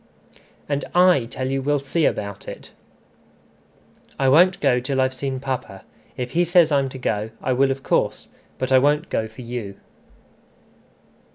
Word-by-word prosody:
"And 145 -1 -1
I 180 -8 +5
tell 130 +2 -4
you 135 0 -1
we'll 145 +2 +1
see 140 +3 -1
about 100 -1 -3
it" - - -9 1.5
"I 135 -1 +2
won't 175 +6 +5
go 125 - +2
till 135 +2 -2
I've 130 0 +1
seen 135 0 -4
papa. 130 -8 -5 0.3
If 125 -1 -4
he 175 +2 +2
says 175 -2 +4
I'm 140 -2 +2
to 130 - -9
go, 110 -4 -2
I 130 - -1
will 135 +2 +3
of 135 0 -3
course; - - -1 0.3
but 130 0 -3
I 130 - +7
won't 150 +5 +1
go 110 - -1
for 110 +3 -12
you." 115 -5 -6
135 Hz, 165 wpm, -22 LUFS, 125-145 Hz, 1.5 s, I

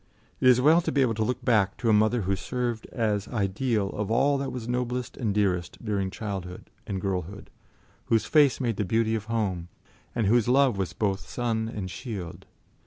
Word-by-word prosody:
It 130 - +3
is 125 -1 +7
well 155 +6 +5
to - - -2
be 140 - +3
able 120 -3 +1
to 110 0 -1
look 125 +4 -3
back 105 -5 +2
to 120 - -3
a - - +5
mother 110 +3 +3
who 95 +2 0
served 120 +1 -3
as 105 -4 -1
ideal 105 0 -1
of 105 -1 -3
all 135 +5 +3
that 140 - -3
was 120 -2 -6
noblest 125 0 -2
and 110 -4 -1
dearest 95 -3 0
during 100 -3 -1
childhood 95 -3 -6 0.2
and 95 -2 -2
girlhood, 95 0 -4 0.5
whose 115 -2 +2
face 145 -4 +4
made 120 -6 -1
the - - 0
beauty 110 +3 +1
of 110 -2 -2
home, 100 -7 -2 0.5
and 115 -3 +1
whose 115 +2 +3
love 130 -1 +4
was 95 -2 -3
both 95 -4 -2
sun 115 -2 -1
and 95 -4 -5
shield. 95 -9 -7
110 Hz, 195 wpm, -27 LUFS, 100-125 Hz, 0.5 s, is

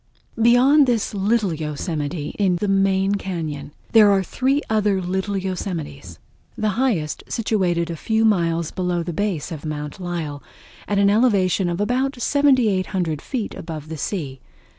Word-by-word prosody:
Beyond 260 +5 +5
this 235 -4 0
Little 205 -1 +1
Yosemite 150 0 -3
in 190 -3 +3
the 205 +4 -2
main 195 0 +2
cañon, 160 -8 -4 0.2
there 215 -2 +7
are 195 -1 +3
three 270 - 0
other 210 -3 +1
little 190 +2 -2
yosemites, 170 - -5 0.4
the 215 - 0
highest 200 - -1
situated 180 -7 0
a - - -4
few 220 +7 +1
miles 170 -6 +1
below 180 -2 -1
the 170 0 -4
base 185 -3 -2
of 155 -3 -6
Mount 150 0 -5
Lyell, 165 -5 -4 0.5
at 205 - 0
an 200 0 +4
elevation 200 -5 +2
of 175 +1 -3
about 255 +5 0
7800 210 - +1
feet 240 -6 -4
above 155 -2 -7
the 160 - -5
sea. 140 -4 -4
190 Hz, 145 wpm, -22 LUFS, 165-215 Hz, 0.5 s, there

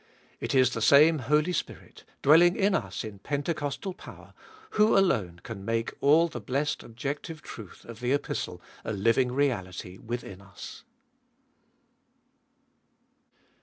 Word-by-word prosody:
It - - -2
is 130 -1 +5
the 115 - -4
same 150 +7 +6
Holy 150 +7 +1
Spirit, - - -6 0.2
dwelling 170 +5 +6
in 200 0 +2
us 195 - -2
in 105 -3 -8
Pentecostal 145 - -3
power, 195 - -13 0.4
who 210 0 +4
alone 105 - +1
can 105 -4 -7
make 115 +2 -1
all 155 +4 +5
the 120 -7 -7
blessed 140 +7 -1
objective 145 +7 -6
truth 105 -5 -11
of 115 -1 -10
the 125 +1 -1
Epistle 145 +1 -2 0.2
a - - -3
living 115 +5 +2
reality 95 -9 -2
within 120 -4 -6
us. 100 +1 -11
130 Hz, 130 wpm, -28 LUFS, 115-150 Hz, 0.4 s, same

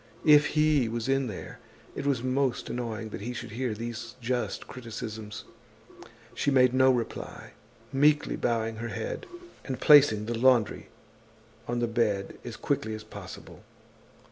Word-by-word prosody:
If 150 -1 +7
he 150 -6 +3
was 115 +1 -3
in 135 -1 +1
there, 100 -5 -8 0.4
it 140 - -3
was 130 -4 +1
most 130 0 0
annoying 115 -2 -4
that 100 - -7
he 120 +4 -4
should 115 - -7
hear 120 -1 -2
these 115 +1 -6
just 125 0 -2
criticisms. 110 -3 -7 0.9
She - - 0
made 125 -2 +5
no 130 0 +5
reply, 120 -3 -3 0.4
meekly 145 +2 +3
bowing 115 -1 -1
her 120 +1 -4
head, - - -5 0.4
and 130 -2 -4
placing 140 -8 +6
the 120 +1 -2
laundry 120 -2 +3 0.8
on 120 0 -1
the 120 - +1
bed 110 -4 -1
as 120 -2 -7
quickly 130 -6 -1
as 110 - -8
possible. 110 - -10
120 Hz, 145 wpm, -28 LUFS, 110-135 Hz, 0.9 s, If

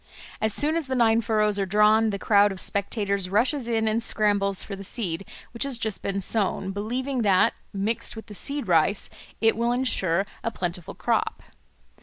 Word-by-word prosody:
As 220 - +2
soon 295 +9 +1
as 330 -4 -2
the 260 - -1
nine 230 -2 +4
furrows 215 -2 +1
are 195 - +1
drawn, 210 +2 +4
the 200 - -2
crowd 205 0 +4
of 190 - -7
spectators 200 -2 -1
rushes 235 +6 +1
in 225 -2 +1
and 220 +2 +1
scrambles 205 -3 +1
for 200 - -6
the 195 - -9
seed 195 -3 -3 0.2
which 235 - -10
has 275 -3 -1
just 220 -3 -2
been 200 0 -2
sown, 195 -2 -1
believing 245 +6 -2
that, 195 -4 +4 0.2
mixed 220 +5 -2
with 220 - -8
the 215 - -11
seed 280 +3 -3
rice, 175 +4 +2 0.3
it 225 0 +4
will 235 +2 +1
ensure 200 -8 0 0.2
a - - 0
plentiful 175 -5 -5
crop. - - -1
215 Hz, 185 wpm, -25 LUFS, 195-230 Hz, 0.3 s, nine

